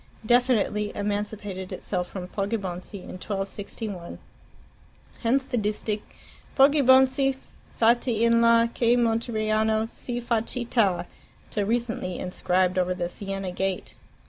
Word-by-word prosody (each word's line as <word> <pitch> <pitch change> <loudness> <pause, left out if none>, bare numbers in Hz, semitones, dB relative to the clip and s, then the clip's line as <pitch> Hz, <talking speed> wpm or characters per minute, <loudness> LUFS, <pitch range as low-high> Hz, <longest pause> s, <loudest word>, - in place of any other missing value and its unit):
definitely 230 -3 +2
emancipated 205 -2 -3
itself 180 -2 -3
from 180 -2 -6
Poggibonsi 195 -1 -4
in 185 - -9
1261. 195 -2 -5 1.0
Hence 260 +3 +2
the 245 -3 -1
distich, 210 0 -2 0.6
"POGGIBONIZZI, 270 -1 +5 0.4
FAUI 230 0 +3
IN 230 0 +4
LA, 230 0 +5
CHE 235 0 +3
MONTERIANO 220 -2 +1
SI 240 -1 -3
FA 235 -2 +1
CITTA!" 230 -7 0 0.5
till 205 -2 0
recently 230 -5 -1
enscribed 185 0 0
over 180 0 0
the 175 -1 -2
Siena 195 0 -4
gate. 190 +1 -3
215 Hz, 110 wpm, -26 LUFS, 195-235 Hz, 1.0 s, POGGIBONIZZI